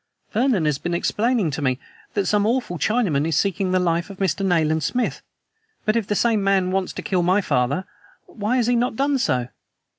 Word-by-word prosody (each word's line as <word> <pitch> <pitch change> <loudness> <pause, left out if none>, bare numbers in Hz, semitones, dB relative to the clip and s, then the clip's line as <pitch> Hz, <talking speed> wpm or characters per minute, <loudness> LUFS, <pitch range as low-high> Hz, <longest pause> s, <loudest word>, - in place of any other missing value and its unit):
Vernon 230 - +2
has 150 -2 0
been 175 0 -2
explaining 215 0 +1
to 150 - -4
me 130 -2 +1 0.4
that 200 -2 +1
some 210 0 +2
awful 230 -8 -1
Chinaman 175 - +1
is 160 -2 0
seeking 195 -1 0
the 185 - +3
life 170 0 0
of 200 - -9
Mr. 190 -2 0
Nayland 160 -4 +2
Smith. 245 +11 -1 0.6
But 215 - +2
if 225 -4 0
the 205 - 0
same 220 -2 +2
man 195 -2 +2
wants 190 -1 -1
to - - -6
kill 185 -2 0
my 185 +3 +3
father, 140 0 0 0.4
why 215 +3 -2
has 240 - +2
he 245 +1 +2
not 240 0 0
done 275 +2 +1
so?" 125 - 0
190 Hz, 205 wpm, -22 LUFS, 165-220 Hz, 0.6 s, the